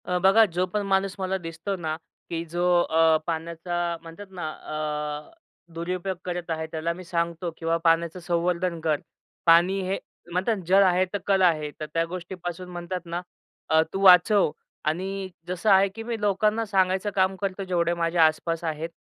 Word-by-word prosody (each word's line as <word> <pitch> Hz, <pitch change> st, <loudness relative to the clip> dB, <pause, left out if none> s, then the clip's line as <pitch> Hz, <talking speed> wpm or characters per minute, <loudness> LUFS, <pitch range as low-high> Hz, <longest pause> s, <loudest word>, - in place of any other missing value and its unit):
अ, 180 Hz, -, 0 dB
बघा 195 Hz, +5 st, +6 dB
जो 180 Hz, -1 st, -1 dB
पण 205 Hz, +3 st, -2 dB
माणूस 195 Hz, -1 st, +1 dB
मला 190 Hz, 0 st, -1 dB
दिसतो 165 Hz, +2 st, -5 dB
ना, 160 Hz, -4 st, -3 dB, 0.3 s
की 165 Hz, -1 st, -2 dB
जो 175 Hz, +2 st, -3 dB, 0.2 s
अ, 160 Hz, 0 st, +4 dB
पाण्याचा 170 Hz, +1 st, -2 dB
म्हणतात 165 Hz, +5 st, -10 dB
ना 175 Hz, -4 st, -4 dB
अ, 150 Hz, -, -4 dB, 0.4 s
दुरुपयोग 180 Hz, +3 st, -3 dB
करत 175 Hz, -1 st, -4 dB
आहे 160 Hz, 0 st, -2 dB
त्याला 165 Hz, +1 st, -2 dB
मी 185 Hz, +2 st, -10 dB
सांगतो 170 Hz, -1 st, -2 dB
किंवा 165 Hz, 0 st, 0 dB
पाण्याचं 165 Hz, +1 st, +2 dB
संवर्धन 175 Hz, 0 st, -1 dB
कर. 155 Hz, -2 st, +1 dB, 0.5 s
पाणी 175 Hz, +3 st, +5 dB
हे 195 Hz, -, 0 dB, 0.3 s
म्हणतात 185 Hz, +6 st, +1 dB
जल 190 Hz, +2 st, +6 dB
आहे 185 Hz, 0 st, +3 dB
तर, -, -, +1 dB
कल 195 Hz, -1 st, +3 dB
आहे. 155 Hz, -4 st, +3 dB
तर 155 Hz, -, -3 dB
त्या 165 Hz, 0 st, +2 dB
गोष्टीपासून 180 Hz, 0 st, -6 dB
म्हणतात 175 Hz, 0 st, -5 dB
ना 170 Hz, +1 st, -3 dB, 0.5 s
अ, 160 Hz, 0 st, +5 dB
तू 195 Hz, -, -2 dB
वाचव 185 Hz, 0 st, +7 dB, 0.3 s
आणि 190 Hz, +5 st, -2 dB, 0.2 s
जसं 180 Hz, +4 st, -1 dB
आहे 195 Hz, 0 st, +6 dB
की 225 Hz, -, -6 dB
मी 230 Hz, -1 st, -3 dB
लोकांना 210 Hz, +2 st, +1 dB
सांगायचं 190 Hz, -1 st, +1 dB
काम 190 Hz, 0 st, +2 dB
करतो 195 Hz, 0 st, -2 dB
जेवढे 175 Hz, -2 st, +1 dB
माझ्या 170 Hz, 0 st, +2 dB
आसपास 165 Hz, +1 st, 0 dB
आहेत, 160 Hz, 0 st, -3 dB
175 Hz, 170 wpm, -25 LUFS, 165-190 Hz, 0.5 s, वाचव